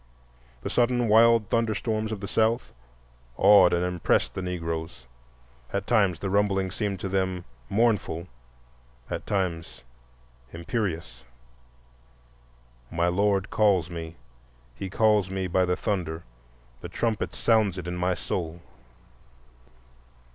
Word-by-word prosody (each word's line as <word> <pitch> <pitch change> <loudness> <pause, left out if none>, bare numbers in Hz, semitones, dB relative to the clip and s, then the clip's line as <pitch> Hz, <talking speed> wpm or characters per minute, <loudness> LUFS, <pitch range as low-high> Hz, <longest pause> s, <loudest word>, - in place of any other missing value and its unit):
The - - -3
sudden 120 0 +2
wild 115 -1 +5
thunderstorms 110 -1 0
of 105 -2 -4
the 100 - -4
South 115 +3 0 0.6
awed 100 -2 +7
and 85 +1 +1
impressed 90 -1 +1
the 95 - -4
Negroes,—at 65 -4 -6
times 100 -8 +2
the 95 - -3
rumbling 95 -2 +1
seemed 100 -1 -3
to - - -2
them 95 -2 -1 0.2
"mournful," 100 -6 +1 0.8
at - - -4
times 90 -8 -2 0.7
imperious: 85 - -4 1.7
"My 85 +1 +1
Lord 100 +1 +1
calls 95 -6 +2
me, 80 -1 -6 0.6
He 95 +10 -6
calls 105 -1 +3
me 95 0 -2
by 90 +1 +2
the 90 0 +1
thunder, 85 -6 -2 0.6
The 85 - -7
trumpet 110 +3 -2
sounds 110 -5 +2
it 90 - -5
in 90 0 -4
my 90 +1 0
soul." 85 -1 -4
95 Hz, 115 wpm, -26 LUFS, 85-105 Hz, 1.7 s, awed